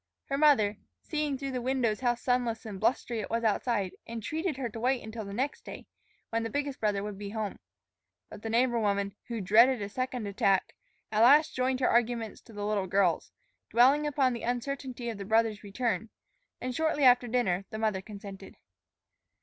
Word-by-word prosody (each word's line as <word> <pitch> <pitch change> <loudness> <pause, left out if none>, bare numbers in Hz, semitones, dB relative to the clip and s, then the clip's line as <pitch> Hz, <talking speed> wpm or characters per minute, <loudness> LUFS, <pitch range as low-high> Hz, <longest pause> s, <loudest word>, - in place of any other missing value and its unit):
Her 275 - 0
mother, 220 -9 +4 0.3
seeing 300 -3 -2
through 275 0 -4
the 250 -1 -3
windows 245 -4 0
how 245 -2 +2
sunless 240 -1 -1
and 205 -3 -6
blustery 235 +1 0
it 205 - -5
was 230 +1 -1
outside, 210 -3 0 0.2
entreated 300 - -3
her 265 -3 -2
to 225 0 -8
wait 255 +2 +1
until 220 0 -6
the 200 - -7
next 260 +8 -2
day, - - -9 0.5
when 230 0 0
the 225 - -3
biggest 285 +2 -3
brother 205 -2 0
would 205 -1 -6
be 205 -1 -5
home. 215 -1 -4 0.7
But - - -11
the 225 - -4
neighbor 240 +1 +2
woman, 200 -2 0
who 230 -3 -3
dreaded 230 +7 +5
a 200 -1 -4
second 255 0 -3
attack, 195 -1 +1 0.4
at 215 0 +2
last 290 +6 +6
joined 255 +1 0
her 250 - +3
arguments 235 -2 0
to - - -14
the 205 -1 -5
little 205 -2 0
girl's, 185 -2 +1 0.4
dwelling 275 +6 +4
upon 270 -3 +2
the 235 - -5
uncertainty 250 0 -3
of 225 -3 -4
the - - -4
brother's 220 +1 +1
return; 215 0 -2 0.5
and 255 0 -3
shortly 315 -2 +1
after 245 -1 +6
dinner 200 -6 0
the 220 - -6
mother 215 -3 0
consented. 200 -1 -10
230 Hz, 190 wpm, -29 LUFS, 210-255 Hz, 0.7 s, last